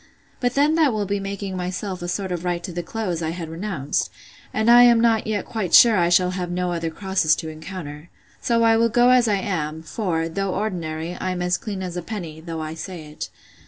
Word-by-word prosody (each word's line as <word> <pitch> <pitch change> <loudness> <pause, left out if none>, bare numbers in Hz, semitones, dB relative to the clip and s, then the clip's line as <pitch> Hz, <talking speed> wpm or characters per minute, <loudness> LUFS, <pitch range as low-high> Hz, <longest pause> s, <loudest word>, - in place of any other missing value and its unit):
But 245 -1 0
then 290 +2 +4
that 315 -6 +3
will 210 -1 -1
be 200 +1 -1
making 195 -1 -4
myself 185 +1 -4
a 175 - -4
sort 190 +2 -3
of 175 -1 -3
right 175 -1 -2
to 180 - -5
the 175 +1 -3
clothes 180 -2 -3
I 160 - -1
had 165 -1 -5
renounced; 165 -4 -2 0.4
and 220 +1 0
I 240 +1 +9
am 240 -1 +7
not 225 -2 +2
yet 210 -3 -1
quite 215 -6 0
sure 235 -2 +8
I 175 -2 +3
shall 180 +1 +4
have 180 -1 -3
no 180 0 -1
other 165 -1 -2
crosses 185 -2 +1
to 160 - -6
encounter. 155 -1 -8 0.3
So 230 -1 +2
I 225 0 +5
will 230 +1 +3
go 245 +2 +4
as 250 -2 +5
I 210 - +3
am; 160 -5 -3
for, 165 -1 -2
though 190 +3 -2
ordinary, 170 -5 -3
I 185 - -3
am 180 -1 -2
as 180 0 +2
clean 195 -2 -5
as 180 -1 -5
a - - -2
penny, 170 -5 -6
though 165 -1 -5
I 155 0 -5
say 160 -2 -8
it. 150 - -6
185 Hz, 235 wpm, -23 LUFS, 165-215 Hz, 0.4 s, I